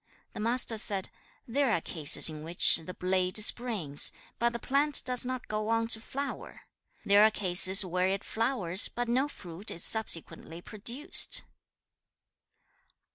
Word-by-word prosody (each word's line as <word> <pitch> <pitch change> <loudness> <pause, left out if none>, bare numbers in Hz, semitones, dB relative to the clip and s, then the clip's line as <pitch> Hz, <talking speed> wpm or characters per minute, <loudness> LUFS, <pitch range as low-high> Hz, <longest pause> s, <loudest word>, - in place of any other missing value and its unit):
The - - -10
Master 230 0 -1
said, 195 -2 -3 0.4
'There 265 +1 -1
are 195 - 0
cases 155 -2 +4
in 155 -1 -6
which 170 +2 +3
the 165 +3 -9
blade 185 +1 -1
springs, 210 - 0 0.3
but 235 0 0
the 235 - -6
plant 280 +4 0
does 250 -1 0
not 255 -1 -7
go 215 0 -5
on 230 0 -2
to 220 - -2
flower! 280 +4 -8 0.4
There 205 +1 +4
are 215 - +5
cases 190 -1 +5
where 180 +1 -2
it 195 +1 -3
flowers, 220 -6 -1
but 245 0 -6
no 255 +4 -1
fruit 185 - -9
is 170 - -3
subsequently 170 -6 +1
produced!' 240 - +1
215 Hz, 145 wpm, -27 LUFS, 180-240 Hz, 0.4 s, are